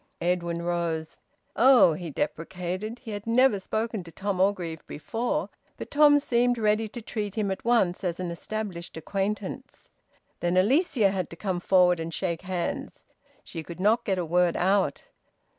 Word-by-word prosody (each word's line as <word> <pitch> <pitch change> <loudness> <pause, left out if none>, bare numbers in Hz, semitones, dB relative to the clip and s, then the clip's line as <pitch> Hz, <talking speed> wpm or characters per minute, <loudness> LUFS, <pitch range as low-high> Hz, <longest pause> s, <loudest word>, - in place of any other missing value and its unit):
Edwin 170 -1 -1
rose. 170 -2 -2 0.4
"Oh!" 245 -7 +6
he 170 +1 -6
deprecated. 180 - -4
He 235 -3 -9
had 205 +1 -6
never 235 -2 +4
spoken 220 +1 -3
to 165 - -12
Tom 195 +1 -2
Orgreave 175 -5 0
before, 240 - -2 0.3
but - - -8
Tom 290 0 +6
seemed 245 -2 +1
ready 215 0 +2
to 235 +2 -9
treat 210 -3 -4
him 210 -3 0
at 190 - -4
once 225 -8 +2
as 175 -2 -2
an 180 -2 -3
established 180 -2 -5
acquaintance. 200 - -4 0.5
Then 175 +1 0
Alicia 230 - +3
had 185 -3 -2
to - - -9
come 185 0 -2
forward 180 -1 +4
and 165 +1 -4
shake 170 -1 -2
hands. 180 -2 -4 0.4
She 165 - -7
could 170 +2 -10
not 220 +5 +3
get 195 -4 0
a 180 - -1
word 175 +1 +2
out. 195 +2 +1
190 Hz, 160 wpm, -27 LUFS, 175-220 Hz, 0.5 s, Oh